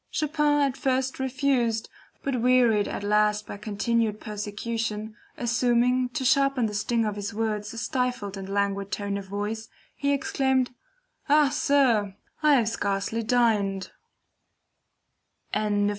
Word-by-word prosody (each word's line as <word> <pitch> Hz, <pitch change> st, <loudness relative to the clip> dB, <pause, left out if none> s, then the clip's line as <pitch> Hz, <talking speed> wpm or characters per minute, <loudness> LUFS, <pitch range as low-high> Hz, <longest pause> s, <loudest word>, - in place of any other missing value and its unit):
Chopin 300 Hz, -1 st, +1 dB
at 275 Hz, -2 st, +1 dB
first 260 Hz, -1 st, 0 dB
refused, 260 Hz, -4 st, 0 dB, 0.4 s
but 260 Hz, -4 st, -1 dB
wearied 240 Hz, -4 st, +4 dB
at -, -, -4 dB
last 210 Hz, 0 st, +2 dB
by -, -, -7 dB
continued 215 Hz, +1 st, -1 dB
persecution, 215 Hz, +1 st, -4 dB, 0.2 s
assuming, 245 Hz, +1 st, +2 dB
to 260 Hz, +1 st, -3 dB
sharpen 275 Hz, -1 st, +3 dB
the 210 Hz, -, -3 dB
sting 230 Hz, +2 st, 0 dB
of 210 Hz, -1 st, -2 dB
his 205 Hz, -1 st, -5 dB
words, 215 Hz, -1 st, -2 dB
a 230 Hz, -, -9 dB
stifled 245 Hz, -3 st, -2 dB
and 195 Hz, 0 st, -7 dB
languid 200 Hz, 0 st, -1 dB
tone 200 Hz, +1 st, -2 dB
of 200 Hz, -1 st, -5 dB
voice, 210 Hz, +3 st, -4 dB, 0.3 s
he 280 Hz, 0 st, 0 dB
exclaimed: 265 Hz, -2 st, +1 dB, 0.6 s
"Ah, 295 Hz, -1 st, +5 dB
sir, 245 Hz, -9 st, +2 dB, 0.3 s
I 300 Hz, -2 st, +5 dB
have 230 Hz, -4 st, +2 dB
scarcely 200 Hz, +1 st, -1 dB
dined!" 215 Hz, -5 st, +1 dB
230 Hz, 130 wpm, -26 LUFS, 210-255 Hz, 0.6 s, Ah